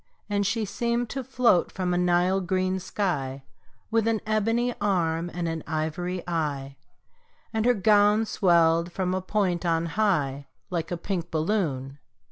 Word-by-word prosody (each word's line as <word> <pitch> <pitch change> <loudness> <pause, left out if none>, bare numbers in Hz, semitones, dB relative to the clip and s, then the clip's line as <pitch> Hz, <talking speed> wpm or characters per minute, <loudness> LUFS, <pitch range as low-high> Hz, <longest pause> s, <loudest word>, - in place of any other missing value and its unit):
And 205 -1 0
she 225 0 0
seemed 235 +3 -1
to 270 - -3
float 245 -8 +2
from 180 -2 -1
a - - +1
Nile 180 +2 +2
green 185 +1 0
sky, 145 -9 -2 0.5
With 225 0 +2
an 225 -1 +2
ebony 225 +3 +1
arm 175 -4 0
and 175 -1 -3
an 165 -1 -3
ivory 170 +3 -2
eye, 145 -5 -2 0.8
And 220 0 0
her 245 - +4
gown 210 +1 +4
swelled 170 -3 +3
from 185 0 -1
a 185 - -1
point 185 -3 0
on 165 -1 +1
high, 155 -8 0 0.2
Like 165 -3 -2
a 175 - -2
pink 175 -1 -3
balloon. 155 -6 -1
180 Hz, 150 wpm, -26 LUFS, 165-210 Hz, 0.8 s, her